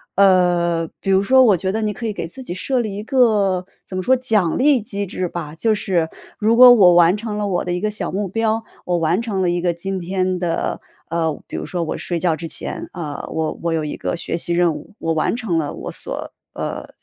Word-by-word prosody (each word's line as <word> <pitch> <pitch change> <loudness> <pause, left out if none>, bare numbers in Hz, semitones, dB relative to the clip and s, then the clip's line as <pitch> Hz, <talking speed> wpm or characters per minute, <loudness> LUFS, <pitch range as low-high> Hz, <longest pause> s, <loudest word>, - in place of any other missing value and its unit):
呃， 175 -3 +3
比 195 - -3
如 190 0 +4
说 260 +6 +5
我 215 -6 +5
觉 190 +3 -1
得 220 +3 -2
你 210 -1 -1
可 230 +3 -5
以 215 - -2
给 165 - -4
自 220 +10 -10
己 175 - -5
设 255 +7 -1
立 215 -4 -2
一 205 - -5
个， 210 -8 +2 0.2
怎 185 - -7
么 - - -1
说， 260 +7 +4
奖 220 -9 +1
励 275 -2 +4
机 200 -1 -4
制 185 -1 -3
吧。 160 -4 -6
就 220 +6 +1
是， 175 -5 0 0.3
如 220 +2 +3
果 250 0 +10
我 190 -7 +6
完 175 +1 +6
成 210 -1 -4
了 210 -1 -1
我 180 -3 0
的 180 - -2
一 180 - -1
个 215 - 0
小 200 -4 -3
目 200 +2 -2
标， 225 +3 0 0.2
我 175 -1 +1
完 170 +5 +1
成 210 -5 -2
了 180 - +2
一 175 - 0
个 175 0 +1
今 190 +3 -4
天 185 +1 -1
的 175 -2 -1 0.3
呃， 160 -2 -1
比 - - -6
如 - - -4
说 175 -2 -2
我 160 - -3
睡 175 - -2
觉 170 0 +1
之 165 - -6
前， - - -4
呃， 155 -5 -5
我 160 -1 -3
我 170 -1 -1
有 160 -1 0
一 150 - -4
个 - - -2
学 170 - -3
习 170 0 -1
任 170 -1 +3
务， 150 +8 -10
我 165 0 -1
完 160 +7 0
成 220 -9 -1
了 150 -3 -2
我 - - -6
所 - - -6 0.2
呃， - - -5
185 Hz, 265 characters per minute, -20 LUFS, 170-215 Hz, 0.3 s, 果